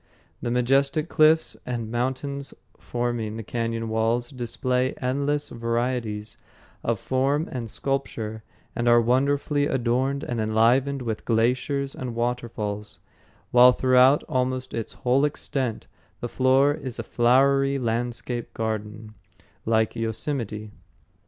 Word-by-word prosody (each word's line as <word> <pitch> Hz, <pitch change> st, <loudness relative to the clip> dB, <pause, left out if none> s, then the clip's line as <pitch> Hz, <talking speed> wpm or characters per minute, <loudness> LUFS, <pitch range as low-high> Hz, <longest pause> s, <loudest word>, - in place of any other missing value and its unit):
The 120 Hz, -, -2 dB
majestic 135 Hz, +6 st, +2 dB
cliffs 155 Hz, +1 st, +4 dB
and 115 Hz, -3 st, -4 dB
mountains 135 Hz, +3 st, -2 dB, 0.2 s
forming 120 Hz, -3 st, -2 dB
the 115 Hz, -, -5 dB
cañon 115 Hz, +1 st, -2 dB
walls 115 Hz, +3 st, 0 dB
display 125 Hz, 0 st, -1 dB
endless 140 Hz, +3 st, -1 dB
variety 115 Hz, -2 st, -2 dB, 0.6 s
of 115 Hz, -3 st, 0 dB
form 135 Hz, +4 st, 0 dB
and 120 Hz, -3 st, -4 dB
sculpture, 110 Hz, -5 st, -3 dB, 0.3 s
and 120 Hz, -, -1 dB
are 120 Hz, 0 st, +7 dB
wonderfully 140 Hz, +4 st, +1 dB
adorned 130 Hz, +3 st, 0 dB
and 120 Hz, -2 st, -2 dB
enlivened 125 Hz, +5 st, +2 dB
with 110 Hz, -3 st, -3 dB
glaciers 130 Hz, +4 st, +1 dB
and 125 Hz, -2 st, -5 dB
waterfalls, 115 Hz, -4 st, -3 dB, 0.5 s
while 125 Hz, +1 st, +8 dB
throughout 130 Hz, +2 st, +5 dB
almost 130 Hz, -3 st, -2 dB
its 115 Hz, -2 st, -4 dB
whole 130 Hz, +3 st, +1 dB
extent 135 Hz, -5 st, -2 dB, 0.3 s
the 120 Hz, -, -3 dB
floor 130 Hz, +3 st, +3 dB
is 130 Hz, -5 st, -6 dB
a 115 Hz, -, -3 dB
flowery 135 Hz, +4 st, +3 dB
landscape 120 Hz, 0 st, -3 dB
garden, 110 Hz, -1 st, -4 dB, 0.5 s
like 110 Hz, -1 st, +2 dB
Yosemite. 110 Hz, -2 st, -3 dB
125 Hz, 115 wpm, -25 LUFS, 115-135 Hz, 0.6 s, while